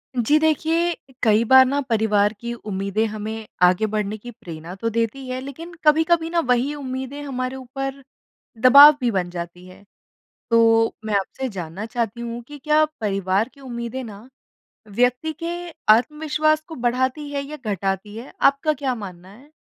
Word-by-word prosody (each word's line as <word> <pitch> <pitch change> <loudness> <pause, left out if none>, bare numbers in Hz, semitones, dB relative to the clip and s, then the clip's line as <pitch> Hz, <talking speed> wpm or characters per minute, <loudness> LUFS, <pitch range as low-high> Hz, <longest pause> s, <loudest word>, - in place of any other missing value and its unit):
जी 250 +6 +3
देखिए, 325 +2 +1 0.3
कई 220 -1 +4
बार 260 +2 +7
ना 280 +2 0
परिवार 215 -4 +1
की 235 +1 -5
उम्मीदें 205 -1 -2
हमें 215 +1 -6 0.2
आगे 180 +4 +4
बढ़ने 210 0 -2
की 240 +3 -10
प्रेरणा 170 -4 -9
तो 230 +4 -2
देती 230 +4 -2
हैं, 255 0 -3
लेकिन 320 +6 -9
कभी-कभी 325 +2 +3
ना, 340 0 +1
वही 255 -1 +1
उम्मीदें 265 0 -5
हमारे 255 -2 -4
ऊपर 270 +1 -6 0.6
दबाव 285 +3 +9
भी 245 -2 +1
बन 185 -4 -1
जाती 175 +1 -7
हैं। 185 +2 -15 0.7
तो 225 0 +4
मैं 215 - -2
आपसे 260 +7 -5
जानना 185 0 -6
चाहती 235 -1 -3
हूँ 235 0 -5
कि 295 - -10
क्या 305 +2 +3 0.2
परिवार 195 +1 0
की 280 - -19
उम्मीदें 240 0 -5
ना, 220 +1 -11 0.6
व्यक्ति 250 +8 0
के 335 - -2 0.4
आत्मविश्वास 305 +4 +1
को 325 - -7
बढ़ाती 260 +3 -1
हैं 280 -1 -2
या 295 +2 -8
घटाती 195 +1 -2
हैं? 235 +4 -9
आपका 280 +3 +3
क्या 270 -3 -2
मानना 185 -5 -9
है? 245 +9 -17
240 Hz, 160 wpm, -22 LUFS, 210-280 Hz, 0.7 s, दबाव